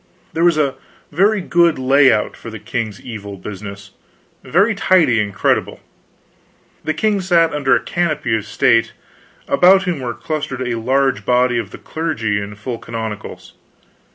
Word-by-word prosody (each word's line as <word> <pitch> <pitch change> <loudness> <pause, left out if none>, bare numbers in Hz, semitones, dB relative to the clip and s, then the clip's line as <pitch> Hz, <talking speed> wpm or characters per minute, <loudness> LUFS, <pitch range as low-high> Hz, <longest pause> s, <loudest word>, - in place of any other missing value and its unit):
There 165 - 0
was 170 -2 +4
a 140 -3 +1 0.4
very 200 +6 +2
good 170 -3 +2
lay 135 +1 +4
out 110 -2 0
for 115 - -10
the 110 - -7
king's 110 -1 -4
evil 105 -4 -8
business 100 +1 -9 0.5
very 200 +7 +2
tidy 170 - +3
and 105 -1 -3
creditable. 100 - 0 1.0
The 155 - -2
king 205 +3 +1
sat 170 -3 +2
under 140 -2 +2
a - - -1
canopy 155 -9 -1
of 110 -1 -4
state; 115 +1 +2 0.5
about 190 +2 +5
him 180 -5 -2
were 120 -2 -4
clustered 150 -5 -4
a 120 -1 -2
large 130 -2 +1
body 125 +1 +2
of - - -5
the - - -10
clergy 115 -11 -2
in 100 +1 -7
full 115 +3 -6
canonicals. 110 -2 -7
130 Hz, 155 wpm, -18 LUFS, 110-165 Hz, 1.0 s, about